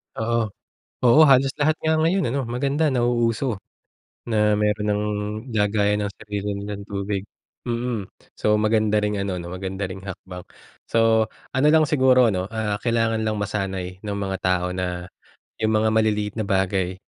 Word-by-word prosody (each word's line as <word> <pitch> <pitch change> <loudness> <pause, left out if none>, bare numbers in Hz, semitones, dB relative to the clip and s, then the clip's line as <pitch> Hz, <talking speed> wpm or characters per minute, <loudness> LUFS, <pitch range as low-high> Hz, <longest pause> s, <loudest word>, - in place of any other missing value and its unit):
Oo. 115 0 0 0.5
Oo, 125 +5 +6
halos 135 -1 +5
lahat 155 +1 +3
nga 160 0 +2
ngayon, 165 +5 +2
ano, 135 0 -1
maganda 140 +5 0
nauuso. 120 -1 +1 0.7
Na 105 -2 +2
meron 105 0 0
nang 105 0 0 0.5
lagayan 105 0 +2
ng 100 - -4
sarili 105 -1 -4
nilang 100 0 -6
tubig, 100 -1 -3 0.4
mm. 120 -5 -3 0.2
So, 105 0 +2
maganda 110 0 +2
ring 105 0 0
ano, 100 -2 -2
'no, 85 - -7
maganda 95 +1 -4
ring 95 +1 -8
hakbang. 90 -1 -8 0.5
So 115 -1 +3 0.2
ano 130 +3 +3
lang 155 -1 +5
siguro, 130 -5 +4
ano, 95 -1 -2
ah, 110 -2 -1
kailangan 115 -2 +1
lang 110 -1 -1
masanay 95 -3 -3
ng 105 -1 -3
mga 95 -1 -2
tao 90 -1 +1
na 90 -1 -3 0.5
'yong 110 - +2
mga 110 0 +3
maliliit 105 -2 +1
na 110 - -1
bagay, 95 -1 0
105 Hz, 155 wpm, -23 LUFS, 100-120 Hz, 0.7 s, Oo